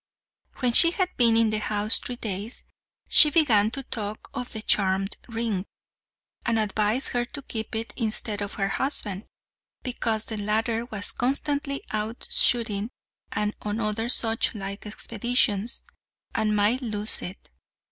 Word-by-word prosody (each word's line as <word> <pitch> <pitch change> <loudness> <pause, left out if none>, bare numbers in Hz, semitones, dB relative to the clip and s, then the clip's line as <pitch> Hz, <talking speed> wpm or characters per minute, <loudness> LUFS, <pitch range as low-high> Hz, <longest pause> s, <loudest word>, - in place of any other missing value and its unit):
When 245 -2 +3
she 335 - +9
had 365 +1 -2
been 230 -2 +5
in 225 -1 +3
the 215 - 0
house 210 0 +4
three 245 - -5
days, 215 0 -5 0.4
she 300 - +8
began 235 -10 +3
to 270 +4 -4
talk 215 -4 -5
of 250 - -5
the 220 -1 -7
charmed 195 -1 +1
ring, 225 -5 -2 0.8
and 235 -1 0
advised 215 +3 0
her 245 -1 -1
to 280 +2 -9
keep 220 -3 -5
it 225 +1 -4
instead 215 -2 0
of 200 - -5
her 195 -1 -1
husband, 210 -5 -1 0.6
because 225 -3 0
the 220 - -5
latter 225 +3 -1
was 215 -4 0
constantly 280 +2 -1
out 215 +2 -4
shooting 220 -3 +2 0.4
and 210 0 -2
on 210 +1 -3
other 225 +1 -1
such 225 -2 +2
like 200 +1 -6
expeditions, 225 0 0 0.5
and 215 -1 0
might 210 +5 +2
lose 215 -3 -2
it. 185 +2 -9
220 Hz, 145 wpm, -25 LUFS, 210-240 Hz, 0.8 s, she